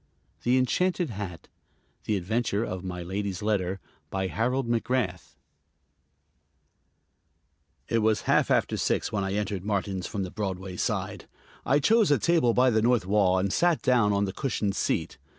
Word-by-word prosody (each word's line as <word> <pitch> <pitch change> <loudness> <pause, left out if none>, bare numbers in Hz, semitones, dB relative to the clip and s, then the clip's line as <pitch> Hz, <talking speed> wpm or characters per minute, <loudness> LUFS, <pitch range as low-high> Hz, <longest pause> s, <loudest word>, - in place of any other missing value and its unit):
THE 125 +2 +2
ENCHANTED 175 +5 +1
HAT 95 -5 -7 0.6
The 105 - +1
Adventure 105 +3 -1
of 95 -5 -5
My 90 -1 -5
Lady's 95 +1 -4
Letter 95 -3 0 0.3
BY 95 -1 -2
HAROLD 125 +4 0
MACGRATH 115 - -1 2.5
It 115 - +1
was 110 -1 +2
half - - +2
after - - +1
six - - 0
when 100 -2 -1
I 95 0 -2
entered 100 -3 -2
Martin's 100 -2 -2
from 100 -2 -3
the 90 - -6
Broadway 95 -2 -4
side. - - -3 0.4
I 140 - +4
chose 220 +8 +4
a 145 - +4
table 160 -9 +2
by 130 0 +4
the 110 -1 +2
north 120 -3 +2
wall 95 -2 +3
and 95 +1 0
sat 175 -2 +2
down 120 -5 +3
on 100 0 +1
the 95 - -4
cushioned 105 -6 -2
seat. - - -1
105 Hz, 155 wpm, -27 LUFS, 95-125 Hz, 2.5 s, I